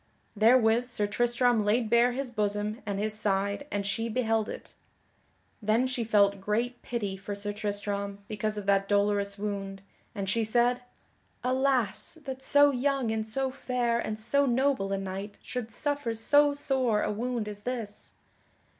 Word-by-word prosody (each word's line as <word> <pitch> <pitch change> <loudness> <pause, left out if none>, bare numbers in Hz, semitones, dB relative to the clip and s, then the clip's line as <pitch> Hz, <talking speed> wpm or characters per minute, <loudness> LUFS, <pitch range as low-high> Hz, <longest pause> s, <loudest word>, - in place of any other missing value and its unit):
Therewith 225 +2 +4
Sir 225 -4 +1
Tristram 240 +1 +2
laid 220 +3 +2
bare 235 +2 +4
his 265 0 -3
bosom 210 0 -1
and 200 -1 -2
his 210 +1 -1
side 200 +4 -1
and 200 -1 -2
she 225 +3 -1
beheld 225 -2 0
it. - - -8 0.9
Then 220 +4 +2
she 255 -2 -2
felt 200 -3 +3
great 235 +5 -1
pity 210 -5 -3
for 200 +1 -6
Sir 205 +1 -3
Tristram 205 -1 -3
because 215 0 -2
of 205 - -5
that 195 0 +2
dolorous 200 0 +1
wound, 195 -1 -4 0.3
and 200 -2 -3
she 225 +4 +1
said: 240 +3 +2 0.6
"Alas, 260 - 0
that 265 -1 -5
so 285 +2 +5
young 265 -2 0
and 220 0 -2
so 265 +4 0
fair 245 -3 -1
and 215 -2 -3
so 280 +6 +2
noble 255 -5 +1
a 195 - 0
knight 195 +1 -5
should 250 -3 -4
suffer 285 -2 -2
so 290 +6 +4
sore 265 -6 0
a - - 0
wound 235 +1 -2
as 205 -1 -7
this!" 225 -4 -5
220 Hz, 160 wpm, -28 LUFS, 205-250 Hz, 0.9 s, so